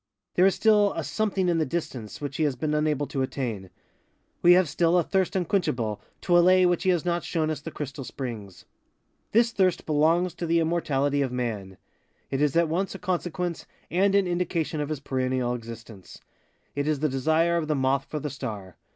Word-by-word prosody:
There 185 +2 +5
is 195 - +2
still 210 -2 +4
a - - -3
something 200 -4 -1
in 170 -2 +2
the - - +3
distance 130 -8 -5
which 145 -2 -5
he 160 - +1
has 140 -3 0
been 150 +5 -2
unable 150 -1 +1
to 135 -1 -3
attain. 115 -8 -3 0.7
We 175 - +7
have 180 -1 +4
still 170 +4 +2
a 175 - +3
thirst 190 0 0
unquenchable, 125 - -1 0.2
to 175 - +2
allay 185 +1 +6
which 175 -1 +2
he 185 - +1
has 175 -2 +1
not 175 0 0
shown 160 -2 -1
us 150 -2 -4
the 165 - -6
crystal 145 -2 -6
springs. 115 -8 -7 0.7
This 230 +1 +4
thirst 185 -5 +1
belongs 165 +3 +2
to 170 - -5
the 165 +1 +3
immortality 145 -4 0
of 135 -3 -1
Man. 110 -7 -4 0.5
It 135 +1 -1
is 150 -1 +2
at 170 0 +4
once 185 +5 -2
a - - -4
consequence 180 -2 -3 0.2
and 195 +3 +3
an 200 -1 +4
indication 175 -3 -1
of 145 - -3
his 155 -3 -4
perennial 130 -2 -1
existence. 115 -4 -9 0.6
It 145 +1 -1
is 150 -2 0
the 155 - +3
desire 160 +5 +2
of 160 -2 -2
the 155 - +1
moth 135 0 +1
for 150 - -5
the 150 0 -4
star. 105 -9 -7
155 Hz, 200 wpm, -26 LUFS, 130-175 Hz, 0.7 s, We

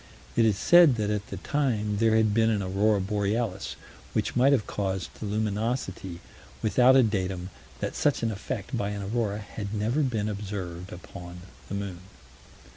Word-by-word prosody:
It 115 - +4
is 105 -3 +3
said 170 - +7
that 105 -2 -1
at 105 -1 -2
the 95 - -6
time 110 -4 0
there 110 +1 +3
had 110 -2 +3
been 110 +1 +4
an 105 -3 +1
aurora 100 +3 +2
borealis, 100 +1 -1 0.4
which - - -1
might 130 +3 +5
have 125 -7 +3
caused 95 -2 -3
the 110 - -4
luminosity, 105 -4 -2 0.4
without 125 +4 +5
a 130 - +7
datum 95 -4 -2 0.3
that - - -2
such 145 -5 +1
an 115 - +1
effect, 110 +2 -4
by 100 -4 -1
an 100 -1 -4
aurora, 105 0 -1
had 105 0 -6
ever 115 +8 +1
been 115 -7 0
observed 95 -3 -5
upon 90 -1 -9 0.3
the - - -3
moon. 100 -3 -4
105 Hz, 170 wpm, -27 LUFS, 100-115 Hz, 0.4 s, said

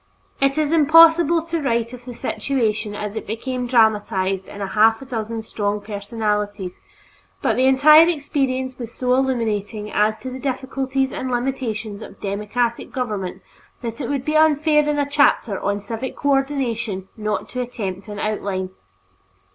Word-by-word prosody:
It 275 +1 +2
is 305 -1 +1
impossible 330 +1 +6
to 335 -1 -3
write 235 -3 0
of 245 -1 -10
the 250 - -7
situation 220 -7 -1
as 210 0 -5
it 220 - -5
became 250 +3 -3
dramatized 205 -5 +2
in 200 - -9
half 215 +3 +3
a 270 - -10
dozen 225 -3 -4
strong 205 -1 -2
personalities, 205 -2 -3 0.6
but - - +2
the 260 +1 +3
entire 305 +5 +7
experience 265 -5 -2
was 235 -2 -6
so 250 +1 0
illuminating 220 -5 -1
as 215 +1 +2
to 260 - -6
the 260 - -6
difficulties 265 0 -2
and 260 - -4
limitations 240 -4 -3
of - - -11
democratic 210 +4 -2
government 210 -8 -4 0.4
that 230 +3 -5
it - - -3
would 275 -2 -2
be 305 - -1
unfair 305 -1 +4
in 295 - 0
a 285 -1 +1
chapter 285 -8 +2
on 200 +1 -1
Civic 230 +5 -5
Cooperation 265 -8 -1
not 215 -1 -2
to 250 - -3
attempt 200 -6 -5
an 205 -1 -7
outline. 200 -3 -2
240 Hz, 155 wpm, -21 LUFS, 210-270 Hz, 0.6 s, entire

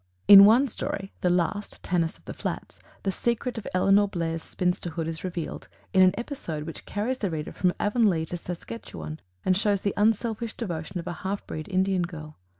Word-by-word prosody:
In 200 -1 +12
one 240 +7 +6
story, 195 -4 -4
the 180 - +2
last, 180 +4 -1
"Tannis 170 -3 0
of - - -28
the - - -6
Flats," - - -5 0.2
the 195 - +1
secret 235 +3 -1
of 210 - -9
Elinor 195 +2 +4
Blair's 165 -3 -2
spinsterhood 175 -2 -2
is 165 -1 -5
revealed 175 -3 -5 0.3
in 190 - +6
an 185 +1 +6
episode 225 - -4
which 165 0 -7
carries 240 +6 -2
the 200 - -1
reader 155 -2 -4
from 180 -1 +1
Avonlea 205 -7 +2
to 175 - -5
Saskatchewan 110 - -7 0.3
and 185 - +4
shows 200 0 +2
the 200 - 0
unselfish 225 +2 +1
devotion 175 -4 -4
of 170 - -5
a 175 - -3
half 195 +2 -3
breed 155 +3 -6
Indian 190 0 +2
girl. 155 -3 -6
185 Hz, 185 wpm, -26 LUFS, 165-205 Hz, 0.3 s, In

